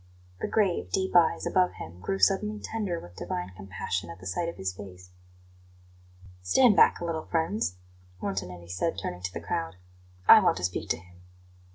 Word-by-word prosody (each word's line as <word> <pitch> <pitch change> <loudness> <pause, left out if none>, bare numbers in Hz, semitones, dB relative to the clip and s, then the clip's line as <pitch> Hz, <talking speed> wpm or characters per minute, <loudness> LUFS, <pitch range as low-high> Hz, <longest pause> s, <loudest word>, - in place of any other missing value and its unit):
The - - -2
grave, 200 -5 +1
deep 190 -1 -1
eyes 175 -2 +4
above 185 -1 +2
him 85 +2 -9
grew 95 +1 -2
suddenly 200 - +2
tender 205 -7 -3
with 85 0 -13
divine 90 +1 -4
compassion 95 -2 -4
at 85 +2 -9
the 95 - -12
sight 170 - -1
of - - -7
his 95 -1 -2
face. 90 -2 -11 1.3
"Stand 205 - +5
bark - - +5
a - - -2
little, 160 -2 -3
friends," 165 - 0 0.4
Montanelli 90 -3 -4
said, 95 - -1
turning 90 0 -5
to 90 0 -3
the - - -5
crowd; 80 +1 -3 0.5
"I - - +11
want - - +2
to 90 - -6
speak 90 0 -2
to - - +1
him." 90 0 -18
95 Hz, 180 wpm, -28 LUFS, -, 1.3 s, I